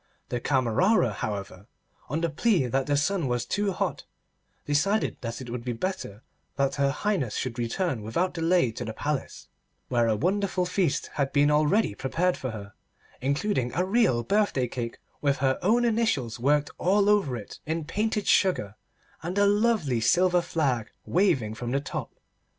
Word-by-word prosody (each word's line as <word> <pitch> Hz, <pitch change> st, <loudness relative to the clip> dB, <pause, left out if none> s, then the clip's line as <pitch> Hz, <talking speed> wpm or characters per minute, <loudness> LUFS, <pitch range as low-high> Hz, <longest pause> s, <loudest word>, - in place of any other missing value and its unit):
The 120 Hz, -, -2 dB
Camerera, 130 Hz, -, +2 dB
however, 100 Hz, -2 st, -5 dB, 0.4 s
on 155 Hz, +5 st, -1 dB
the 170 Hz, -, +1 dB
plea 185 Hz, -, +2 dB
that 130 Hz, +2 st, -1 dB
the 145 Hz, -1 st, +2 dB
sun 170 Hz, +1 st, 0 dB
was 120 Hz, -1 st, -1 dB
too 205 Hz, +7 st, 0 dB
hot, -, -, -3 dB, 0.6 s
decided 185 Hz, +9 st, +1 dB
that 115 Hz, +1 st, -5 dB
it 120 Hz, -2 st, -7 dB
would 120 Hz, -1 st, -4 dB
be 125 Hz, 0 st, -2 dB
better 125 Hz, -, -4 dB, 0.3 s
that 135 Hz, -1 st, +1 dB
her 140 Hz, 0 st, +2 dB
Highness 155 Hz, -, -1 dB
should 125 Hz, -1 st, -3 dB
return 120 Hz, -, -1 dB
without 140 Hz, -, -1 dB
delay 165 Hz, -5 st, +2 dB
to 110 Hz, -, -6 dB
the 110 Hz, -, -5 dB
Palace, 145 Hz, +4 st, -4 dB, 0.4 s
where 120 Hz, -2 st, +2 dB
a 110 Hz, -, +2 dB
wonderful 185 Hz, -, 0 dB
feast 180 Hz, -4 st, 0 dB
had 140 Hz, -2 st, -1 dB
been 145 Hz, +1 st, +4 dB
already 150 Hz, -, +3 dB
prepared 165 Hz, -, 0 dB
for 130 Hz, -, -4 dB
her, 105 Hz, -3 st, -8 dB, 0.5 s
including 135 Hz, -, 0 dB
a 180 Hz, +3 st, +1 dB
real 190 Hz, -, +2 dB
birthday 200 Hz, -, +1 dB
cake 120 Hz, -1 st, -5 dB, 0.2 s
with 140 Hz, -1 st, +2 dB
her 130 Hz, 0 st, +1 dB
own 235 Hz, +6 st, +3 dB
initials 215 Hz, -, 0 dB
worked 145 Hz, +3 st, +2 dB
all 200 Hz, +3 st, +3 dB
over 200 Hz, -12 st, +2 dB
it 105 Hz, -, -10 dB
in 160 Hz, 0 st, -2 dB
painted 210 Hz, +4 st, -1 dB
sugar 180 Hz, -, +2 dB, 0.5 s
and 175 Hz, +4 st, -4 dB
a 205 Hz, -, +5 dB
lovely 200 Hz, -, +2 dB
silver 180 Hz, +7 st, +3 dB
flag 135 Hz, -10 st, -1 dB, 0.2 s
waving 135 Hz, -, +2 dB
from 120 Hz, +2 st, -5 dB
the 135 Hz, +3 st, +1 dB
top. 140 Hz, -, -6 dB
145 Hz, 165 wpm, -27 LUFS, 120-190 Hz, 0.6 s, a